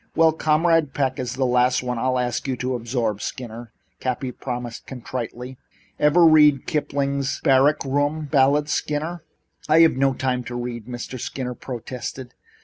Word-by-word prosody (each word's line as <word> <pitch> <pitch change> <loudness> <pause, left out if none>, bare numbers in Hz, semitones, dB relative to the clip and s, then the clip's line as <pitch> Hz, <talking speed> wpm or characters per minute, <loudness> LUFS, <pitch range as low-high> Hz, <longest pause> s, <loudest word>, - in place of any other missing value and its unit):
"Well, 160 -1 +5
Comrade 160 -1 +2
Peck 135 -2 0
is 125 -1 -3
the 130 0 0
last 125 0 +2
one 125 -1 -2
I'll 130 +1 +1
ask 125 +1 -2
you 130 -2 -1
to 130 +1 -2
absorb, 115 -3 -2
Skinner," 120 -1 -6 0.3
Cappy 130 0 -2
promised 125 -2 -6
contritely. 125 0 -6 0.4
"Ever 155 +4 +5
read 150 -4 +6
Kipling's 140 -3 -1
Barrack 140 +3 +4
Room 145 +3 0
Ballads, 145 +1 +2
Skinner?" 155 +4 -2 0.5
"I 160 +2 +6
have 165 -5 +5
no 135 0 +2
time 125 -1 -1
to 120 - -6
read," 120 -2 -5
Mr. 125 +1 -6
Skinner 125 +1 -4
protested. 125 0 -7
130 Hz, 150 wpm, -23 LUFS, 125-145 Hz, 0.5 s, read